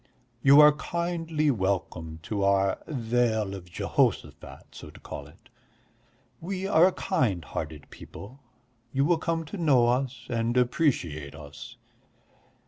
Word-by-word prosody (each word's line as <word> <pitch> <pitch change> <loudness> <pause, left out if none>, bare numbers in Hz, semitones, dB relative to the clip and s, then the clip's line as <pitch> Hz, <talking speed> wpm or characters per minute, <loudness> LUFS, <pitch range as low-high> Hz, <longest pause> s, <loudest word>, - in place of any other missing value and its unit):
You 140 +3 +7
are 150 0 +9
kindly 165 -1 -1
welcome 95 -6 -2
to 100 +3 -2
our 100 -1 +2
Vale 115 -6 0
of 90 -2 -9
Jehoshaphat, 70 -5 -2
so - - -10
to - - -15
call 70 - -8
it. 80 +6 -21 0.9
We 185 +2 -4
are 185 -1 +5
kind 95 -9 -1
hearted 75 -1 -6
people, 125 +8 -11 0.5
you 135 +2 +1
will 165 +1 +2
come 165 0 -2
to 155 - -7
know 135 -8 +4
us 125 -1 -1
and 115 +1 -1
appreciate 90 - 0
us. 75 -3 -11
120 Hz, 130 wpm, -27 LUFS, 95-150 Hz, 0.9 s, are